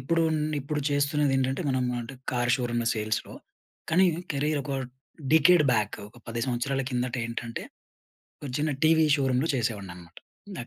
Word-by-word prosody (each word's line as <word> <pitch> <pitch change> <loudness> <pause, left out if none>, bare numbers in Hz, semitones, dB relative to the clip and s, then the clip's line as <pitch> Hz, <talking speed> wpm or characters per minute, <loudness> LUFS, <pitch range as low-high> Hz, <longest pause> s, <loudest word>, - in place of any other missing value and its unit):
ఇప్పుడు, 165 +6 +1 0.4
ఇప్పుడు 150 +2 -3
చేస్తున్నది 145 0 +1
ఏంటంటే 135 +5 0
మనం 130 -1 +1 0.2
అంటే 120 +3 -8 0.2
కార్ 120 -1 +1
షోరూమ్‌ 120 -2 -1
సేల్స్‌లో. 110 0 -2 0.6
కాని 185 +3 +5 0.3
కెరియర్ 145 +1 0
ఒక 140 - -4 0.6
డికేడ్ 160 0 +6
బ్యాక్. 105 -3 0
ఒక 115 - -18
10 115 +1 -3
సంవత్సరాల 130 +2 -1
కిందట 125 0 -1
ఏంటంటే, 115 0 -5 0.8
ఒక 140 - -5
చిన్న 150 0 0
టీవీ 160 0 +5
షోరూమ్‌లో 135 +2 +1
చేసేవాడిని 105 -7 -2
అన్నమాట 90 - -11
130 Hz, 140 wpm, -27 LUFS, 120-150 Hz, 0.8 s, డికేడ్